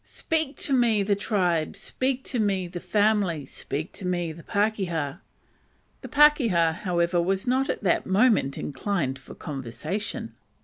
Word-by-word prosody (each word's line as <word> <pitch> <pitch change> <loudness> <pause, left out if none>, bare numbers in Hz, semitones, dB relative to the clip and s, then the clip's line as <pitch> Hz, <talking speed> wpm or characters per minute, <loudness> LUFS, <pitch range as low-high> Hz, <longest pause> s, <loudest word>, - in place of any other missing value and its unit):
"Speak 315 -3 -2
to 280 - 0
me, 235 -5 +3
the 200 +1 +2
tribe! 180 -6 0
speak 260 +6 -2
to 245 - -2
me, 195 -4 +1
the 175 0 -6
family! 205 -7 +1
speak 150 +4 -5
to - - -10
me, 175 -2 -1
the 165 +2 -10
pakeha!" 185 -7 -1 0.8
The - - -7
"pakeha," 240 - +4
however, 175 -2 +1
was 190 +4 -1
not 260 +2 +1
at - - -2
the 180 - +3
moment 195 - +3
inclined 140 -2 -2
for 135 - -12
conversation. 150 - -5
190 Hz, 145 wpm, -26 LUFS, 165-220 Hz, 0.8 s, pakeha